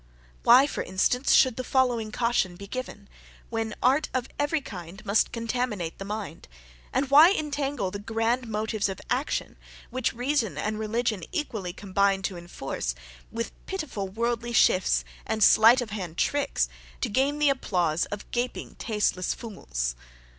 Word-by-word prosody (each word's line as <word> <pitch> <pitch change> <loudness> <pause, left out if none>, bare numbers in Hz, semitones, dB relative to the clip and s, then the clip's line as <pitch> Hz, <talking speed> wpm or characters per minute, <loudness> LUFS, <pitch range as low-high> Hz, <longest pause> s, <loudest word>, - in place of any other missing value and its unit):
Why, 250 +4 +7
for 285 - -3
instance, 220 +8 +1
should 255 -3 +5
the 255 - -2
following 245 -5 +1
caution 230 -6 0
be 200 +3 -9
given, 205 -3 -6 0.4
when 225 -2 -2
art 275 +5 +3
of 255 -1 -1
every 290 +2 +1
kind 190 - -9
must 200 +2 +2
contaminate 230 -7 -2
the 195 - -5
mind; 205 -6 -6 0.4
and 270 0 0
why 305 +5 +9
entangle 285 - -2
the 200 - -5
grand 225 +3 -1
motives 215 -1 -1
of 190 - -5
action, 265 +4 -1 0.3
which 255 0 0
reason 245 -2 -1
and 215 0 -2
religion 220 -1 -1
equally 225 - -3
combine 195 +1 0
to 190 - -2
enforce, 135 - -4 0.4
with 230 0 -3 0.2
pitiful 310 - -4
worldly 235 +3 -2
shifts 185 -4 +3 0.2
and 220 -1 0
slight 230 +6 +7
of 230 -4 -5
hand 180 -6 -5
tricks 285 -1 +1 0.3
to - - +1
gain 270 +6 +1
the 295 -1 +4
applause 175 - 0
of 205 0 -6
gaping 245 +1 -3
tasteless 210 -4 0
fools? - - -4
225 Hz, 150 wpm, -27 LUFS, 200-255 Hz, 0.4 s, why